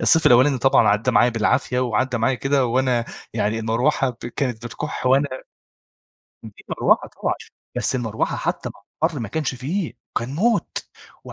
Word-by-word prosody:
الصيف 160 0 +4
الأولاني 130 +2 +5
طبعًا 135 +2 +4
عدى 105 +5 +2
معي 120 +2 +4
بالعافية 125 +3 +1
وعدى 125 0 0
معايا 115 +4 +2
كده 135 0 +1
وأنا 125 -1 +1 0.3
يعني 105 +2 0
المروحة 120 +5 +1 0.3
كانت 120 -4 -2
بتكح 130 +3 -5
وأنا 135 +2 +4 1.1
في 110 -2 -12
مروحة - - +2
طبعًا - - +1 0.4
بس - - +1
المروحة 115 -4 -1
حتّى - - -2
مع - - -20 0.2
الحر 160 -4 +1
ما 110 - -4
كانش 155 -4 -2
فيه، 150 - -3 0.3
كان 125 +4 -5
موت. 220 +5 0 0.4
و - - -9
125 Hz, 155 wpm, -22 LUFS, 115-140 Hz, 1.1 s, الأولاني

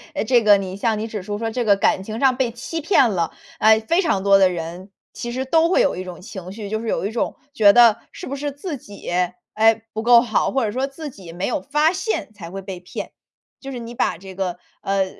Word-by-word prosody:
呃， - - 0
这 240 +1 +4
个 205 -1 +7
你 190 -1 -5
像 220 0 0
你 220 - -3
指 215 -3 -5
出 205 +2 -4
说 225 0 -3
这 245 +1 -1
个 200 - +5
感 195 -1 +2
情 220 +3 -6
上 265 -2 +4
被 255 -3 +1
欺 275 +7 -5
骗 285 - +4
了， 170 -5 -1 0.3
呃， 220 0 +6
非 335 - +2
常 200 - 0
多 200 0 +6
的 190 -1 +5
人， 175 +3 -6 0.2
其 240 0 -5
实 260 +2 -2
都 325 +4 +3
会 - - +4
有 - - +2
一 185 - -5
种 180 -1 -9
情 185 -2 -8
绪。 205 -1 -7
就 220 0 -2
是 230 - -6
有 195 - -1
一 210 - -2
种 230 - -2 0.2
觉 205 -7 +6
得， 235 -2 +7
是 - - -9
不 280 - -4
是 290 +1 -3
自 290 +1 -6
己， 205 -4 -10 0.4
哎， 225 +1 +3
不 220 - -3
够 235 0 +7
好？ 220 -4 +1
或 265 -4 +1
者 205 - -2
说 260 +4 -1
自 295 +2 -8
己 190 -8 -12
没 180 +3 -3
有 245 - -1
发 300 +3 +2
现 375 - -3
才 170 -5 -9
会 195 +1 -6
被 190 -2 -7
骗。 180 - -7 0.5
就 275 0 -8
是 245 - -5
你 235 +1 -8
把 195 - 0
这 190 +1 -11
个， 180 -2 -2 0.2
呃， 195 -1 +1
220 Hz, 270 characters per minute, -21 LUFS, 195-260 Hz, 0.5 s, 个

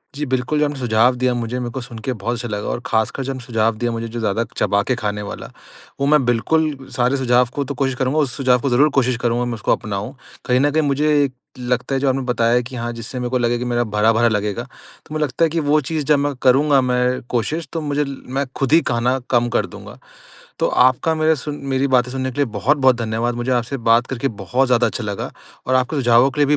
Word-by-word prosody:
जी 150 +1 -3
बिल्कुल, 130 +3 -1
जो 150 - +3
आपने 145 -2 -4
सुझाव 120 +1 +3
दिया 130 -1 +2
मुझे 120 +1 -3
मेरे 120 -1 -3
को 130 - -5
सुन 120 -1 -10
के 130 +4 -3
बहुत 115 +1 -3
अच्छा 120 0 -5
लगा 105 -1 -4
और - - -2
ख़ासकर 110 +4 0
जो 135 +1 -3
म - - -7
सुझाव 115 -2 0
दिया 120 +1 -1
मुझे 115 0 -4
जो 115 +1 -6
ज़्यादा 110 0 0
चबा 100 0 +2
के 130 - 0
खाने 105 -3 -3
वाला, 100 - -7 0.5
वो 140 - +1
मैं 150 -1 +4
बिल्कुल 150 +6 +1 0.2
सारे 125 +2 +2
सुझाव 125 -1 +3
को 145 - -1
तो 140 +1 -5
कोशिश 135 0 -1
करूँगा 130 +4 0
उस 135 -5 0
सुझाव 130 -3 +3
को 140 - 0
ज़रूर 135 +5 +4
कोशिश 130 -2 +2
करूँगा 120 0 0
मैं 120 - -3
उसको 110 - -1
अपनाऊँ। 105 +4 -2 0.3
कहीं 125 -1 +2
न 145 +2 +2
कहीं 155 +2 +2
मुझे 145 0 +2 0.3
लगता 125 +2 -1
है - - +1
जो 140 - +1
आपने 135 +1 0
बताया 120 -2 +1
है 125 0 +3
कि 125 +2 -9
हाँ, 120 0 -3
जिससे 115 +2 -7
मेरे 125 0 -2
को 130 - +1
लगे 120 0 +1
कि 125 - -3
मेरा 120 0 +1
भरा-भरा 110 +1 +2
लगेगा 105 +1 -1 0.4
तो - - -11
मुझे 155 0 0
लगता 145 +3 -1
है - - 0
कि 165 - 0
वो 150 0 +3
चीज़ 155 +2 -3
जब 150 0 +4
मैं 145 0 0
करूँगा 135 +2 +4
मैं 125 0 0
कोशिश 150 +7 -2
तो 165 - -2
मुझे 145 -1 0
ल 140 -1 -7
मैं 135 +2 -1
खुद 135 -1 -1
ही 165 +2 +6
खाना 120 +2 +1
कम 120 -1 +2
कर - - +1
दूँगा। - - -11 0.6
तो - - +2 0.2
आपका 145 +6 0
मेरा 155 0 +3
सुन 150 -1 -4 0.2
मेरी 135 +1 +1
बातें 125 0 0
सुनने 130 0 -3
के - - -14
लिए - - +3
बहुत-बहुत 130 +4 +3
धन्यवाद। 115 +2 -1
मुझे 120 +2 -2
आपसे 125 +2 -1
बात 120 +2 +4
करके 130 +1 -2 0.2
बहुत 130 +8 +1
ज़्यादा 125 -1 +3
अच्छा 120 - -4
लगा 100 -2 -4 0.4
और 130 - +2
आपके 130 +4 +1
सुझावों 120 -1 +4
के 150 - -6
लिए - - +5
125 Hz, 250 wpm, -20 LUFS, 120-140 Hz, 0.6 s, ही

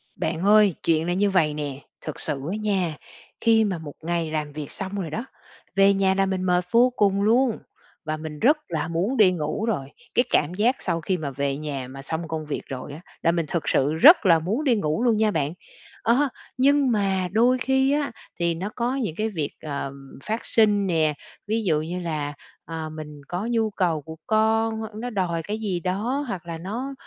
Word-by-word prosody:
Bạn 165 +2 -2
ơi, 210 -4 +6
chuyện 165 0 +2
là 175 - +1
như 200 +3 +2
vầy 165 -6 +2
nè, 145 -3 -4 0.3
thực 155 - -5
sự - - -1 0.2
á - - -1
nha, 185 -7 0 0.4
khi 225 -1 +5
mà 195 -5 -1
một 150 -3 -8
ngày 165 -1 -1
làm 150 -1 -2
việc 150 -1 -6
xong 190 -1 -5
rồi 165 - -4
đó, 220 +11 -4 0.5
về 195 0 +6
nhà 195 -1 +2
là 195 0 +2
mình 190 -1 -2
mệt 180 -1 +2
vô 240 +2 +6
cùng 200 -3 +2
luôn, 235 +3 +3 0.5
và 155 0 -2
mình 155 -1 -7
rất 290 - +5
là 160 -2 -2
muốn 180 +10 -1
đi 205 -5 +6
ngủ 160 +4 -2
rồi. 145 -12 -2 0.2
Cái 245 - +5
cảm 150 +3 +2
giác 225 +7 +2
sau 165 - -1
khi 185 +3 0
mà 150 -4 -4
về 140 +1 -1
nhà 140 -4 -4
mà 135 +1 -9
xong 160 +4 -4
công 160 -1 -4
việc 150 - -3
rồi 135 +1 -6
á, 155 - -9 0.2
là 165 - +3
mình 170 -1 0
thực 165 0 -2
sự 140 +3 +2
rất 270 - +7
là 165 -3 +6
muốn 205 - -1
đi 260 -5 +3
ngủ 160 +2 0
luôn 235 -3 +3
nha 215 0 +3
bạn. 155 -3 -1 0.5
A, 265 +5 +3 0.3
nhưng 275 0 +4
mà 195 -4 +1
đôi 240 +5 +4
khi 265 +1 +2
á, 290 0 0 0.3
thì 170 -1 +1
nó 185 +5 -4
có 245 +2 0
những 220 - -2
cái 215 +3 -1
việc, 160 -9 -3
ờ, 140 -2 -4 0.3
phát 220 +2 -3
sinh 205 -3 +3
nè, 160 -4 +2 0.3
ví 220 +1 0
dụ 155 -6 +2
như 175 +3 -4
là, 150 -4 -3 0.3
à, 160 -1 -5
mình 150 -2 -9
có 180 +4 -3
nhu 225 -2 +2
cầu 175 -6 0
của 160 +3 -9
con, 220 0 +2 0.2
nó 245 - -3
đòi 180 -6 -1
cái 210 +5 -4
gì 195 -5 -1
đó 215 - -1
hoặc 185 -7 -5
là 165 -1 -5
nó, 230 +11 -4
185 Hz, 215 wpm, -24 LUFS, 155-220 Hz, 0.5 s, rất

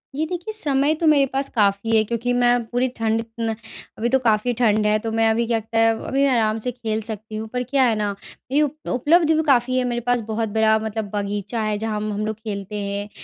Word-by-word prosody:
ये 310 +3 0
देखिए, 355 +6 -5
समय 290 -7 +1
तो 325 - -2
मेरे 290 -3 +5
पास 275 +1 -1
काफ़ी 205 +1 +2
है 220 - +5
क्योंकि 235 +3 -2
मैं 245 0 +3
पूरी 245 +3 0
ठंड 225 0 0 0.2
न 225 -1 -1 0.4
अभी 235 +2 0
तो 265 +2 +3
काफ़ी 230 0 +1
ठंड 215 -3 +3
है 210 0 +3
तो 225 +1 -4
मैं 225 0 +2
अभी 230 +1 +1
क्या 230 -1 +1
त 220 - -14
है 225 0 +5 0.2
अभी 275 +1 +2
आराम 225 -5 +2
से 250 - 0
खेल 220 -3 -3
सकती 215 -1 -6
हूँ 220 +1 -4
पर 250 0 -1
क्या 265 +2 +2
है 230 -3 +2
न 205 -1 -1 0.4
ये 290 +3 +3
उप 300 +1 -3
उपलब्ध 315 +6 +3
भी 315 0 +2
काफ़ी 255 -1 +3
है 255 - +2
मेरे 240 -1 -2
पास 245 0 +1
बहुत 220 0 -1
बड़ा 220 +1 +3
मतलब 220 -1 -4
बगीचा 205 +2 -3
है 215 -1 -1
जहाँ 220 0 -3
हम 210 0 -3
हम 210 +1 -2
लोग 220 0 -2
खेलते 210 -1 -6
हैं। 200 0 -4
225 Hz, 240 wpm, -22 LUFS, 215-255 Hz, 0.4 s, मेरे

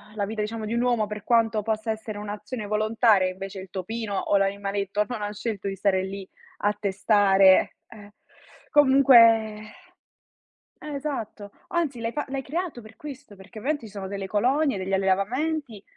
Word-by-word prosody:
la 205 -2 -1
vita, 215 +1 -4
diciamo, 220 +1 -4
di 220 - -3
un 235 - +1
uomo, 240 -4 +1
per 210 -1 -7
quanto 225 -2 +2
possa 220 +1 -2
essere 220 -1 -6
un'azione 210 +2 -6
volontaria, 215 -2 +2
invece 190 +1 -7
il 190 -1 -10
topino 210 +2 -4
o 200 - 0
l'animaletto 200 +1 -1
non 245 -4 -5
ha 205 - -3
scelto 210 -2 -4
di 195 - -4
stare 190 -1 +1
lì, 195 0 -6 0.3
a 205 0 +1
testare 195 -1 +4
eh! 205 -2 -14 0.6
Comunque 275 -3 +6 1.7
eh, 300 -1 -6
esatto, 230 -8 -5 0.2
anzi 330 -9 -1
l'hai 230 0 -2
fa 295 - -2
l'hai 270 0 -3
creato 320 -1 -4
per 220 -1 -15
questo. 280 -7 -10
Perché 195 +3 -13
ovviamente, 285 0 -2
ci 205 - -13
sono 195 -2 -6
delle 195 -1 -4
colonie, 255 +4 +1
degli 190 +1 -4
allevamenti 220 +6 -1
215 Hz, 165 wpm, -25 LUFS, 200-245 Hz, 1.7 s, Comunque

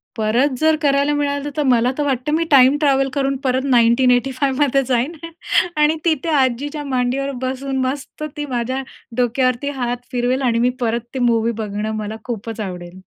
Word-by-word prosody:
परत 235 +6 +1
जर 315 0 +4
करायला 280 0 +2
मिळालं, 285 0 -1
तर 300 - +2
मला 250 -2 +3
तर 295 - 0
वाटतं, 270 0 -1
मी 325 +2 +2
टाईम 270 0 +6
ट्रॅव्हल 270 -2 +2
करून 275 -1 0
परत 260 0 +1
1985मध्ये 260 +3 +2
जाईन 255 +4 +1 0.6
आणि 300 +1 +3
तिथे 325 -1 +1
आजीच्या 290 +1 0
मांडीवर 265 0 -1
बसून, 265 +1 -3
मस्त 280 +3 -5
ती 295 - -3
माझ्या 255 0 -2 0.4
डोक्यावरती 255 +2 +1
हात 245 0 -1
फिरवेल 250 +2 0
आणि 235 -3 +1
मी 245 +1 +3
परत 235 -1 0
ती 265 - -3
मूव्ही 230 -2 +2
बघणं, 210 0 -3
मला 215 0 -4
खूपच 225 -1 -5
आवडेल. 180 -1 -7
260 Hz, 160 wpm, -19 LUFS, 240-280 Hz, 0.6 s, टाईम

